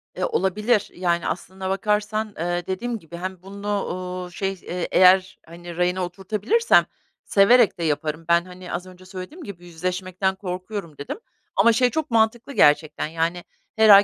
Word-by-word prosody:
Eee, - - -1
olabilir. 210 - +1
Yani 175 -1 0
aslında 190 +2 -4
bakarsan, 210 +2 0
eee, 175 +2 -2
dediğim 225 +5 -3
gibi 170 0 -10
hem 185 0 -5
bunu, 200 +1 -3
uuu, 180 0 -5
şey, 195 +2 -2
eee, 180 -1 -5
eğer, 185 0 +5
hani, 170 0 -10
rayına 180 +1 +1
oturtabilirsem 210 - +2 0.4
severek 205 -1 +5
de - - -2
yaparım. 155 +1 -1
Ben, 170 0 +4
hani, 180 0 -9
az 180 - -3
önce 185 0 -14
söylediğim 190 - -8
gibi 175 -7 -9
yüzleşmekten 185 +2 -2
korkuyorum, 185 -3 -6
dedim 145 - -6 0.4
ama 235 - +5
şey 250 +2 +3
çok 310 +1 -3
mantıklı 230 +4 +1
gerçekten, 150 - +3
yani, 165 +2 -2 0.3
her 220 0 +5
ay 200 0 +10
185 Hz, 160 wpm, -23 LUFS, 175-210 Hz, 0.4 s, ay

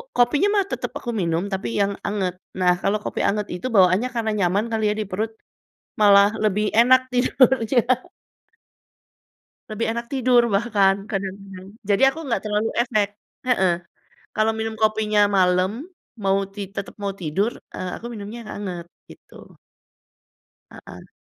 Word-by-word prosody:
kopinya 285 +9 +3
mah 400 - +3
tetep - - -3
aku 240 - -4
minum, 165 0 0
tapi 190 - -3
yang 200 0 +1
anget. 195 -3 -1 0.3
Nah, 180 -1 +4
kalau 200 +2 +1
kopi - - -4
anget 205 0 -1
itu 180 - -4
bawaannya 190 +4 +4
karena 220 -2 0
nyaman 195 +4 +1
kali 220 -1 -1
ya, - - -2
di - - -3
perut, 220 +4 -2 0.7
malah 200 -1 +7
lebih 210 0 +1
enak 255 +2 +6
tidurnya. 250 -1 +3 1.9
Lebih 215 +2 -2
enak 235 0 -4
tidur 250 -2 +4
bahkan, 200 -3 +3
kadang-kadang. 195 -1 -6 0.2
Jadi 200 +5 +2
aku 270 - -3
nggak 235 - 0
terlalu 210 +1 0
efek, 215 -5 +1 0.4
heeh. 190 -7 +3 0.6
Kalau 220 0 +2
minum 220 0 -3
kopinya 215 -1 +2 0.2
malam, 185 +1 +3 0.5
mau 195 0 +3 0.2
ti 205 - -5
tetep 200 - -5
mau 200 -1 -2
tidur, 190 +8 0 0.2
eee, 185 - -4
aku 235 - -11
minumnya 210 +2 -7
yang - - -8
anget, 180 -4 -5 0.2
gitu. - - -16 1.4
Heeh. - - -13
210 Hz, 145 wpm, -22 LUFS, 195-230 Hz, 1.9 s, malah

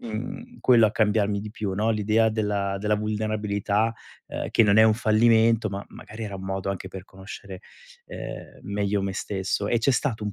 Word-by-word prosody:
mhmm, 125 - -6
quello 120 -3 +6
a - - 0
cambiarmi 105 -2 +1
di 105 +1 -7
più, 105 -2 -4
no, 110 +3 +1
l'idea 110 +1 +2
della 100 -2 -1
della 105 +1 +1
vulnerabilità, 105 0 -1 0.4
ehm, - - -4
che 115 - +5
non 100 +1 +4
è - - +8
un 110 -1 +5
fallimento, 115 0 +3
ma 100 +1 -5
magari 110 +2 -10
era 100 -2 -6
un 95 - -8
modo 95 0 -2
anche 95 -1 -5
per 95 -1 -9
conoscere, 95 0 -10 0.5
ehm, - - -8
meglio 100 0 -1
me 95 0 -2
stesso, 100 +1 -2
e 120 - +2
c'è 130 +4 +2
stato 115 -5 -1
un 105 - -3
105 Hz, 190 wpm, -25 LUFS, 100-110 Hz, 0.5 s, è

